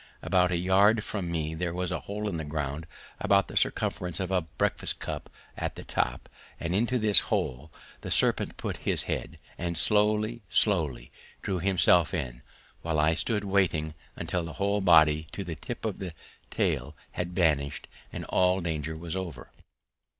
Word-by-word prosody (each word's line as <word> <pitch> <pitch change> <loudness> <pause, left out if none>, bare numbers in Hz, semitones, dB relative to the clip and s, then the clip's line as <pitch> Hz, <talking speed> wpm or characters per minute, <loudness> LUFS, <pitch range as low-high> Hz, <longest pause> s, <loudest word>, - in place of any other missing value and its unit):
About 90 -1 +3
a 90 - 0
yard 100 +5 +4
from 95 -6 -4
me 80 -1 -2
there 85 +1 -3
was 90 -1 -2
a - - -1
hole 105 +1 -4
in 95 - -2
the 80 - -4
ground 75 +1 -4 0.3
about 100 -1 +3
the - - -10
circumference 90 -2 +1
of 95 0 -2
a 95 -1 +2
breakfast 80 -3 -2
cup - - -5 0.3
at - - -3
the - - -8
top, - - -2 0.3
and 85 +1 -2
into 120 +6 +1
this 105 -4 +7
hole 65 +5 -2 0.3
the - - -6
serpent - - +3
put - - -4
his - - -1
head - - -4 0.2
and 85 -1 -2
slowly, 105 +5 +2
slowly 75 - +1 0.3
drew 95 -2 -1
himself 90 -1 +3
in, 60 -7 -4 0.4
while 80 -1 -1
I 75 +2 +4
stood 105 +4 0
waiting 95 -6 +1 0.2
until 90 -2 -2
the 80 -1 -6
whole 100 +5 0
body 80 -4 +5
to 100 - -4
the 85 - -5
tip 115 +9 -7
of 105 -4 -3
the 90 -5 -6 0.3
tail 75 +5 -1 0.2
had 90 0 -4
vanished 75 -5 +1 0.2
and - - -6
all 90 0 +2
danger 80 -2 -3
was 85 +1 -4
over. 95 -3 -6
90 Hz, 170 wpm, -28 LUFS, 80-100 Hz, 0.4 s, this